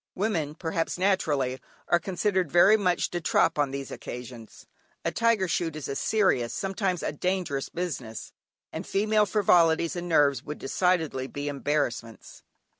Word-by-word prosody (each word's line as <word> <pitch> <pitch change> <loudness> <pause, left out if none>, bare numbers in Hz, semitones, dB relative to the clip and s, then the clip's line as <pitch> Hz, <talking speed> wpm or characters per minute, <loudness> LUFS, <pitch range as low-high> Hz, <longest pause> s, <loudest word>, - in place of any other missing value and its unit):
Women, 170 -8 -1
perhaps 165 +1 -2
naturally, 150 -9 0 0.3
are 175 - +3
considered 185 -2 -1
very 185 +5 +6
much 180 -5 0
"de 175 - -3
trop" 165 -1 +2
on 145 -2 +2
these 140 0 -6
occasions. 120 -2 -9 0.4
A - - +1
tiger 230 -5 +2
shoot 165 -2 -1
is 155 - -5
a 140 - -3
serious, 185 - +1
sometimes 195 -2 -2
a - - -1
dangerous 170 -3 -2
business, 135 -11 -5 0.4
and 160 - -5
female 210 +1 +2
frivolities 170 -5 +3
and 175 0 -5
nerves 140 -5 +3
would 150 - -6
decidedly 160 -4 0
be 145 +1 -5
embarrassments. 140 -5 -3
165 Hz, 145 wpm, -27 LUFS, 140-185 Hz, 0.4 s, very